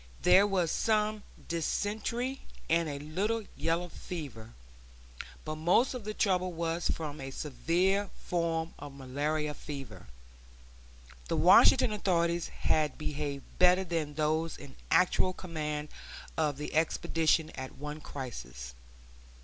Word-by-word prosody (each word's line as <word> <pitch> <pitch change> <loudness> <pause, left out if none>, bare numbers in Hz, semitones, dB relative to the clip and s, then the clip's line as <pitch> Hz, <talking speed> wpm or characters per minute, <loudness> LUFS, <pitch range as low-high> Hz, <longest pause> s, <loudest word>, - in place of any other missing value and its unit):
There 200 +2 +7
was 180 -5 +1
some 215 -1 +1 0.3
dysentery, 220 - -1 0.3
and 165 -1 +2
a 145 - -4
little 195 +10 -1
yellow 170 +2 0
fever; 135 -12 -7 0.9
but 155 0 -4
most 175 +12 +3
of 245 -5 -6
the 215 - -3
trouble 185 -3 +2
was 170 0 -1
from 150 -3 -3
a 135 - -5
severe 180 +9 0 0.2
form 165 -1 -1
of 145 -1 -9
malarial 150 +3 -1
fever. 135 -11 -8 1.2
The - - 0
Washington 245 - +7
authorities 170 -5 +1
had 155 -1 0
behaved 145 -2 -3 0.2
better 180 +1 +6
than 165 -5 -2
those 155 +1 0
in 140 -2 -12
actual 185 0 +3
command 150 -4 -4 0.5
of 150 -3 0
the 150 - -5
expedition 160 0 +2
at 130 0 -7
one 150 +2 -6
crisis. 65 - -7
160 Hz, 120 wpm, -31 LUFS, 150-180 Hz, 1.2 s, There